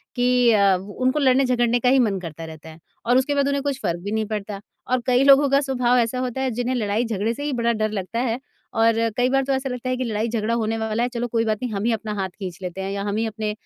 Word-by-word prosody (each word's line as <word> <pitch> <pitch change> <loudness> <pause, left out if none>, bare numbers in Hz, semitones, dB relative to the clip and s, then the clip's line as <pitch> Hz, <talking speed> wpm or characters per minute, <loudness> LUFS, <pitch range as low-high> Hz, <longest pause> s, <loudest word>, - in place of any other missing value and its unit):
कि 245 -1 +3
अ, 200 -3 +4
उनको 255 +9 -1
लड़ने-झगड़ने 250 -3 +3
का 250 - +2
ही 265 +1 +5
मन 210 -6 +1
करता 165 -2 -7
रहता 160 0 -11
है 160 +1 -13 0.3
और 245 +2 +4
उसके 285 +2 +1
बाद 280 -1 +2
उन्हें 280 -1 0
कुछ 280 -2 -2
फ़र्क 170 -6 -1
भी 205 - -4
नहीं 220 0 0
पड़ता 205 -1 -5 0.3
और 255 -1 +2
कई 250 +1 +4
लोगों 275 +1 +6
का 275 +1 +4
स्वभाव 250 -3 +1
ऐसा 235 +2 0
होता 255 0 -3
है 265 -1 0
जिन्हें 245 +2 -2
लड़ाई-झगड़े 220 -1 -1
से 285 - -7
ही 295 -1 -2
बड़ा 235 -1 +1
डर 215 -1 -1
लगता 205 +2 -3
है। 240 -1 -1 0.4
और 230 0 +4 0.2
कई 250 0 +3
बार 270 +1 +2
तो 275 - 0
ऐसा 265 0 -2
लगता 250 0 -4
है 255 - 0
कि 255 - -2
लड़ाई 225 -1 -1
झगड़ा 225 0 -1
होने 225 -1 -1
वाला 220 +1 -1
है। 245 - 0
चलो 240 0 -2
कोई 230 -1 0
बात 215 -1 0
नहीं 250 - -2
हम 200 0 -2
ही 235 - +2
अपना 215 -1 -4
हाथ 190 -1 -1
खींच 185 -4 -6
लेते 185 +1 -5
हैं 190 0 -3
या 200 0 -3
हम 200 - -2
ही 225 - 0
अपने 215 -1 -3
235 Hz, 275 wpm, -22 LUFS, 210-255 Hz, 0.4 s, लोगों